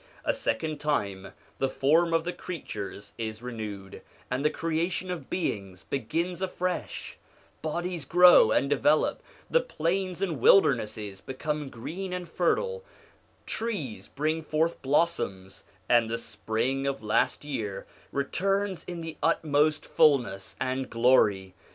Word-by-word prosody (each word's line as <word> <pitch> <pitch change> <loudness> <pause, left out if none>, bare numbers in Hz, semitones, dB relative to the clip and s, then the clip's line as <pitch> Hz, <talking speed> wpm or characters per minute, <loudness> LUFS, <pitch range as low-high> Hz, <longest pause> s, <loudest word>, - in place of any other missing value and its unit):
A - - +2
second 150 +7 -2
time 100 -11 -1 0.3
the 135 - +1
form 160 +6 +3
of 165 0 +2
the 180 +1 -3
creatures 100 - -7
is 110 0 -4
renewed, 105 -5 -6 0.3
and 130 +2 0
the 150 - +4
creation 170 +4 -2
of 180 - -6
beings 100 - -3
begins 165 +8 -2
afresh; 185 -1 -3 0.4
bodies 170 0 -3
grow 175 -7 +7
and 135 - +2
develop, 150 +2 +2 0.3
the - - +4
plains 185 - -1
and 175 -8 -1
wildernesses 105 - +3
become 150 +2 -3
green 180 +11 -6
and 180 -1 -4
fertile, 475 - 0 0.6
trees 200 - -3
bring 155 +3 -1
forth 160 +2 0
blossoms, 135 - 0 0.2
and 120 -2 +4
the 115 - -1
spring 115 +5 -2
of 135 -4 -2
last 105 +6 +1
year 110 -9 -4 0.3
returns 195 +7 -1
in 175 -1 -6
the 165 -1 -6
utmost 155 -1 +2
fulness 135 -11 +2
and 130 0 -2
glory. 105 -6 +3
150 Hz, 125 wpm, -28 LUFS, 115-170 Hz, 0.6 s, grow